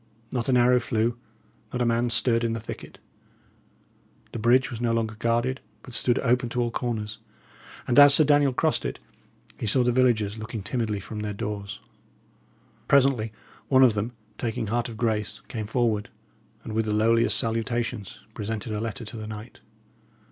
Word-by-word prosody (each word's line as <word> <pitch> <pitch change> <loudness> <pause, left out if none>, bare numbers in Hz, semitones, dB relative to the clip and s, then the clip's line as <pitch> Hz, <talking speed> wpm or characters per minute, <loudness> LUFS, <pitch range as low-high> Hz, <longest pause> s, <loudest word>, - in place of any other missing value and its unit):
Not 125 0 -2
an 125 - +4
arrow 125 +1 +5
flew, 115 -1 0 0.6
not 125 - -3
a 120 - +2
man 120 +1 +1
stirred 115 0 +2
in 115 -1 0
the 115 - -3
thicket; 110 - -9 1.3
the 115 - -5
bridge 125 +5 +3
was 120 -1 -6
no 120 -1 +1
longer 115 -1 -1
guarded, 120 +4 0 0.2
but 125 - -11
stood 120 0 +2
open 125 0 +2
to 125 - -3
all 120 -1 0
corners; 110 -3 -3 0.7
and 130 +2 +5
as 145 0 +9
Sir 155 - +7
Daniel 145 -2 +4
crossed 125 - 0
it, - - -3 0.6
he - - -3
saw 125 +5 +3
the 125 - +2
villagers 115 -4 +2
looking 110 -1 -6
timidly 110 -1 -2
from 105 +3 -7
their 105 -1 -3
doors. 100 0 -5 1.1
Presently 130 -5 +3 0.4
one 130 -1 +5
of 125 -4 +6
them, 110 +4 -3 0.3
taking 115 -2 -2
heart 120 +2 -1
of 115 - -8
grace, 110 -3 -1
came 110 -3 -5
forward, 115 -3 0 0.5
and 110 - -6
with 110 0 +1
the 105 - -1
lowliest 115 +2 +3
salutations, 115 -2 -2
presented 110 0 -4
a 105 - -2
letter 115 0 -4
to 105 +2 -7
the 110 -1 -6
knight. 110 +2 -9
115 Hz, 175 wpm, -26 LUFS, 110-125 Hz, 1.3 s, as